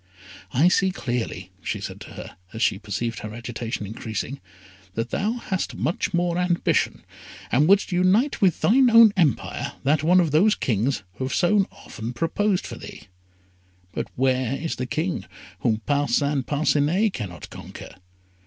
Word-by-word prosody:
"I 145 +8 +4
see 190 +1 +3
clearly," 120 - -4
she - - -3
said - - -7
to - - -10
her, - - -9 0.2
as 110 - -2
she 95 - +2
perceived 110 +2 -3
her 105 0 -7
agitation 115 -2 -5
increasing, 110 +6 -5 0.5
"that 115 +1 -2
thou 210 +4 0
hast 210 -6 -3
much 175 +4 -1
more 175 -1 0
ambition, 180 -1 +1 0.5
and 145 +5 +4
wouldst 200 +1 +4
unite 185 +10 +2
with 185 -4 +3
thine 255 +3 +5
own 230 -2 +8
empire 160 - 0
that 145 +2 +2
of - - -4
one 180 +2 +6
of 165 -4 +2
those 195 +8 +4
kings 115 0 0
who 130 - -2
have 130 - -2
so 195 +2 +3
often 115 +2 -8
proposed 185 +7 0
for - - -7
thee; - - -10 0.9
but - - -3
where 130 0 +1
is 165 +3 -4
the 125 - -3
King 165 +7 -2 0.3
whom 110 -1 0
Parcin 145 0 +1
Parcinet 155 +7 +2
cannot 90 -7 -6
conquer? - - -10
150 Hz, 160 wpm, -24 LUFS, 120-185 Hz, 0.9 s, own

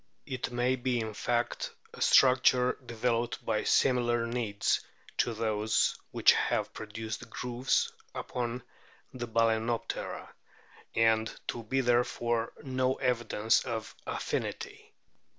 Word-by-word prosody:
It 130 -3 -3
may 125 +2 +1
be 125 -1 0
in 110 -1 -3
fact 120 +3 -1 0.2
a - - -11
structure 125 -1 +5
developed 120 0 -1
by 110 -1 0
similar 120 -2 +3
needs 115 -4 0 0.4
to 120 - +1
those 110 -1 +1
which - - +5
have - - 0
produced 110 0 -5
the - - -11
grooves 125 +1 0 0.2
upon 120 0 -3 0.5
the 120 -2 -5
Bal&noptera, 115 0 0 0.7
and 110 -1 +3 0.2
to 120 - -2
be 130 +4 0
therefore 120 -1 +1
no 130 -1 0
evidence 120 -3 +1
of 115 -3 -4
affinity. - - -4
120 Hz, 115 wpm, -30 LUFS, 115-125 Hz, 0.7 s, structure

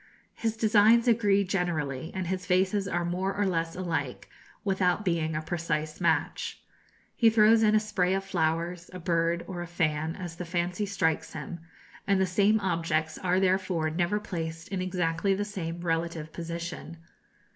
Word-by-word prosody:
His 225 -1 -2
designs 220 +2 +5
agree 205 -4 +4
generally, 165 -6 -2
and 190 -1 -2
his 185 +1 -3
vases 190 +2 +2
are 175 -2 -1
more 185 +3 -1
or 205 0 +1
less 165 -3 -1
alike, 160 -8 -3 0.4
without 190 0 +1
being 165 -3 0
a 155 - -2
precise 155 -1 -3
match. 165 -2 0 0.6
He 230 - +5
throws 220 0 +5
in 215 -1 +4
a - - +6
spray 195 -3 0
of 195 - -1
flowers, 170 -1 -1
a 185 - -6
bird, 170 0 0
or 180 -2 -5
a 175 - -5
fan, 160 -1 -1
as 175 -3 -7
the 180 - -4
fancy 175 +4 -1
strikes 160 -5 0
him, 160 +3 -6 0.5
and 200 -1 +3
the 190 - +3
same 200 +4 +3
objects 160 -4 -1
are 185 0 +1
therefore 185 -4 +1
never 175 +5 0
placed 165 -5 -5
in 190 -2 -2
exactly 180 +1 0
the 205 +1 -2
same 170 -4 -5
relative 165 -2 -2
position. 170 0 -6
180 Hz, 165 wpm, -28 LUFS, 165-195 Hz, 0.6 s, a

